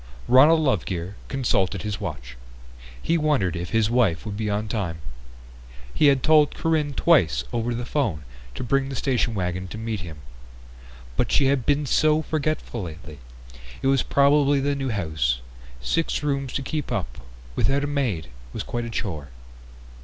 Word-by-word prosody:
Ronald 150 +6 +6
Lovegear 95 - -1
consulted 100 -8 0
his 105 -2 -4
watch. 65 -7 -6 0.6
He 165 - +1
wondered 145 - +1
if 85 0 -4
his 110 0 +2
wife 115 -9 +2
would 105 -2 -4
be 105 0 -2
on 105 +1 -1
time. 100 -7 -2 1.0
He 150 - +4
had 135 -2 +3
told 155 -1 +4
Corinne 155 -3 0
twice 80 - +3
over 120 +1 -1
the 120 +1 -4
phone 110 - -1 0.3
to - - -4
bring 135 +2 +1
the 135 - -5
station 120 -3 0
wagon 90 0 -2
to 105 - -8
meet 110 -1 -3
him. 80 -4 -9 0.9
But - - 0
she 140 - +4
had 135 -3 +1
been 145 0 +2
so 155 +3 +3
forgetful 155 -6 -2
lately. 80 -3 -9 0.6
It - - +2
was 135 -1 +3
probably 140 0 +3
the 140 +1 0
new 135 -1 -2
house; 80 - 0 0.4
six 160 - 0
rooms 140 -3 -1
to 140 - -2
keep 150 +2 -3
up - - -3 0.4
without 140 +1 +1
a - - +1
maid 125 - -1 0.2
was - - -4
quite 120 0 -3
a - - -5
chore. 80 -11 -4
120 Hz, 165 wpm, -24 LUFS, 90-140 Hz, 1.0 s, Ronald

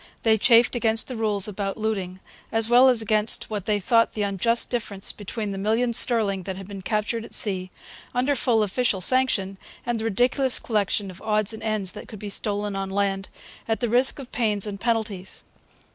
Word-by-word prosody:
They 220 -1 +4
chafed 230 +2 +4
against 225 -2 +1
the 255 - -4
rules 210 -3 +1
about 200 -1 -4
looting, 195 -4 -3 0.3
as 225 0 +2
well 245 +2 +6
as 235 -3 +2
against 215 +1 0
what 205 -1 -4
they 210 -1 +1
thought 230 +4 +2
the 210 - -2
unjust 205 +4 0
difference 210 -5 -2
between 210 0 -5
the 195 - -5
million 225 +4 0
sterling 220 -5 +4
that 190 +1 -5
had 195 -1 -9
been 200 -1 -8
captured 215 +3 -2
at - - -3
sea, 185 -3 +1 0.4
under 255 +4 0
full 235 -3 +2
official 210 0 0
sanction, 195 -3 +2 0.3
and 240 -1 -1
the 220 - -4
ridiculous 245 +4 +1
collection 205 -3 -1
of 185 - -14
odds 215 -1 0
and 220 - -9
ends 215 -4 -1
that 210 - -10
could 215 - -10
be 205 +1 -7
stolen 205 0 -2
on 195 0 -3
land, 195 0 -1 0.4
at 225 -1 -1
the 240 - -1
risk 250 +3 +3
of 270 -3 -10
pains 215 -4 +1
and 200 -2 -6
penalties. 220 -5 -2
215 Hz, 195 wpm, -24 LUFS, 200-230 Hz, 0.4 s, well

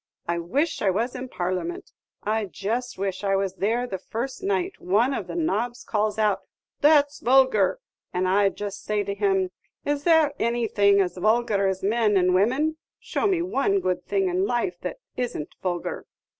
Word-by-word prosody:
I 170 0 0
wish 270 - -1
I 200 - +3
was 225 +7 0
in 255 0 -6
Parliament 215 - -3 0.3
I 215 +1 0
just 230 +6 -3
wish 195 0 -3
I 195 -1 +2
was 195 -1 -1
there 230 +5 +1
the 195 -6 -5
first 235 +7 -5
night 195 -2 0
one 220 +9 +2
of - - -3
the - - -6
nobs 245 -8 -1
calls 215 -1 -1
out 210 -2 +2 0.4
'That 290 -1 +5
's - - -13
vulgar;' 260 - +4 0.3
and 185 +1 0
I 200 +2 +4
'd - - -16
just 205 -1 -5
say 210 -1 0
to 200 0 -3
him, 195 -2 +1 0.3
'Is 290 0 -1
there 320 -3 +4
anything 220 -4 +3
as 185 -1 -2
vulgar 215 0 +2
as 190 0 -2
men 210 0 +2
and 180 0 +3
women? 260 +12 +2 0.2
Show - - -1
me 365 -4 +1
one 275 - +1
good 185 -1 -1
thing 195 -1 +1
in 185 +2 +1
life 245 +10 -1
that - - -4 0.2
is 245 -1 -2
n't 150 - -6
vulgar! 175 -2 -3
210 Hz, 185 wpm, -25 LUFS, 195-250 Hz, 0.4 s, That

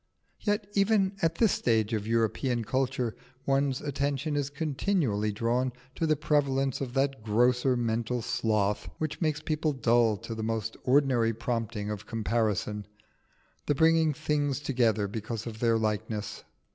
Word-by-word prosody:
Yet 205 0 0
even 200 -1 +2
at 165 0 +2
this 225 -5 +3
stage 115 -2 +1
of 105 -1 -2
European 115 +2 +1
culture 130 -1 -1 0.3
one's 135 -1 +1
attention 145 +1 -1
is 145 -1 0
continually 145 - 0
drawn 120 +4 0 0.2
to 165 - -1
the 155 - +3
prevalence 140 -3 +1
of 130 -1 -4
that 135 -2 +1
grosser 125 +4 +2
mental 115 +1 -1
sloth 105 -3 0
which 155 +1 -3
makes 155 -2 0
people 155 0 0
dull 120 -4 +3
to 115 - -7
the 110 - -5
most 110 0 -2
ordinary 125 -4 +3
prompting 115 -3 -3
of 105 -3 -6
comparison 105 -2 -1 0.8
the 145 - +2
bringing 160 +1 +4
things 145 -2 -1
together 120 -7 +1
because 110 +2 -5
of 110 -2 -7
their 115 -1 +3
likeness. 105 -1 -2
125 Hz, 145 wpm, -29 LUFS, 110-145 Hz, 0.8 s, bringing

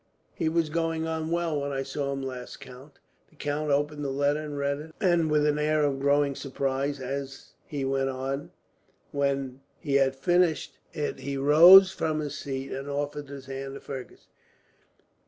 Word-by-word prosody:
"He 160 - -1
was 160 -1 0
going 165 0 -1
on 160 0 -3
well 165 -3 0
when 140 0 -3
I 135 -1 -2
saw 140 +1 -3
him 135 0 -4
last, 130 -2 -7
count." 135 +1 -13 0.3
The - - -26
count 150 +1 -2
opened 145 +1 0
the 140 - -2
letter 145 +2 +1
and 150 -1 -6
read 140 0 -1 0.2
it, 175 -5 +3
with 150 -1 +2
an 150 0 +1
air 155 0 +2
of 140 -2 0
growing 140 0 +2
surprise 135 +1 -2
as 135 +1 -5 0.2
he 140 -3 -3
went 135 0 0
on. 135 +2 -4 0.6
When 140 -2 -1 0.2
he 140 -2 +1
had 135 -1 +2
finished 175 +3 +1
it, 150 - -3
he 140 0 -4
rose 170 +7 +9
from 155 -4 -1
his 150 -2 -4
seat 135 -1 -5
and 135 +2 -5
offered 145 0 -3
his 140 -1 -9
hand 135 0 -6
to - - -7
Fergus. 130 -2 -9
140 Hz, 175 wpm, -27 LUFS, 135-150 Hz, 0.6 s, rose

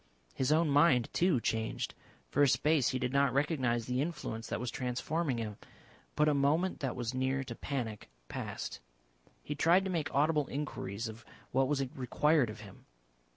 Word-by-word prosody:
His 130 +2 0
own 160 +2 +4
mind, 140 -4 +4
too, 175 -7 +3
changed. 110 -1 -2 0.4
For 145 - +2
a 145 - +7
space 150 0 +3
he 130 - -1
did 125 0 -2
not 140 -2 +3
recognise 130 -6 +1
the 125 +2 0
influence 135 -8 -4
that - - -2
was 125 0 -3
transforming 130 +3 -1
him. 110 -3 -4 0.6
But 150 - +3
a 150 - +4
moment 150 +7 +2
that 135 -3 -2
was 120 0 -3
near 130 +1 0
to 125 -3 -6
panic 115 - -4 0.2
passed. - - -5 0.6
He 145 - -3
tried 170 +6 +4
to 190 - -1
make 160 -3 -1
audible 150 +1 +2
inquiries 115 -7 -4
of 110 +1 -9 0.3
what 135 +1 +3
was 140 -1 0
required 140 +1 +2
of 110 0 -8
him. 100 -3 -14
135 Hz, 175 wpm, -32 LUFS, 120-150 Hz, 0.6 s, a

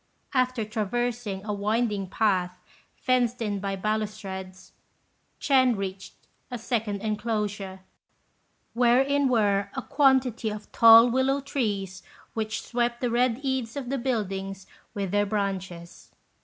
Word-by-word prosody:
After 255 -3 +1
traversing 215 -1 -3
a 210 - -2
winding 210 -1 -1
path 185 -4 0 0.4
fenced 250 -1 +1
in 205 -3 -2
by 195 0 -3
balustrades, 195 -2 -4 0.7
Ch'ên 255 -4 +3
reached 195 -1 -6 0.3
a 245 - -4
second 220 -4 -2
enclosure, 210 -3 -3 0.9
wherein 265 +4 +3
were 200 -4 +2
a 265 - -3
quantity 260 -5 +2
of 210 0 -8
tall 230 +1 +8
willow 265 +2 +2
trees 205 -9 -3 0.3
which 220 -1 -3
swept 240 0 -1
the 245 -2 -1
red 245 +1 +1
eaves 260 -4 -2
of 265 -3 -5
the 275 - -1
buildings 195 -6 -3 0.3
with 195 -3 -3
their 205 0 +2
branches. 190 -4 -4
220 Hz, 120 wpm, -26 LUFS, 200-245 Hz, 0.9 s, tall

